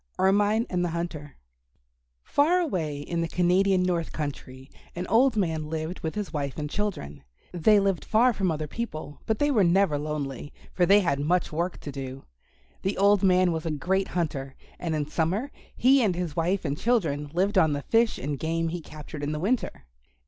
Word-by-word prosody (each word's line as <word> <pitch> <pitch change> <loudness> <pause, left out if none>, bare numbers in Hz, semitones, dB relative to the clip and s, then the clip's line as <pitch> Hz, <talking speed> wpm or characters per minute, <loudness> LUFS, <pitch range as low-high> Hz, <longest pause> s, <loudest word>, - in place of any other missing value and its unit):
ERMINE 205 +4 +3
AND 180 -1 -1
THE 175 - 0
HUNTER 155 -4 -5 0.9
Far 315 +5 +3
away 170 - -2
in 170 +3 -3
the 165 - -1
Canadian 180 +2 +2
North 175 -3 -1
Country 135 -3 -6 0.3
an 175 +1 -3
old 245 +5 +3
man 160 -6 -1
lived 160 +2 -4
with 160 - -4
his 210 -3 -4
wife 140 -3 -3
and 150 -1 -3
children. 145 - -4 0.3
They 190 +5 +4
lived 195 -3 0
far 240 +3 +3
from 195 -4 0
other 155 -1 -2
people, 155 -6 -6
but 220 - +1
they 290 +3 +2
were 220 -7 +4
never 170 -4 +3
lonely, 145 -2 -4 0.2
for 175 -2 +2
they 205 +1 +6
had 140 -7 0
much 175 +5 +1
work 170 +4 -2
to 145 - -6
do. 135 -1 -7 0.6
The 195 +1 -2
old 200 0 +4
man 185 -2 +4
was 160 0 -3
a - - 0
great 180 +6 0
hunter, 140 -6 -3 0.2
and 165 -3 -2
in 150 -1 -1
summer 180 - -1 0.2
he 265 +2 +5
and 200 -6 +2
his 175 -4 -3
wife 175 +3 0
and 140 -1 -1
children 155 -10 0
lived 190 +4 +2
on 160 -4 +3
the 145 0 -3
fish 230 0 +2
and 140 +1 -4
game 165 +1 -1
he 175 +1 -4
captured 150 -1 -9
in 145 +1 -2
the 150 - -3
winter. 185 - -1
170 Hz, 190 wpm, -26 LUFS, 150-195 Hz, 0.9 s, they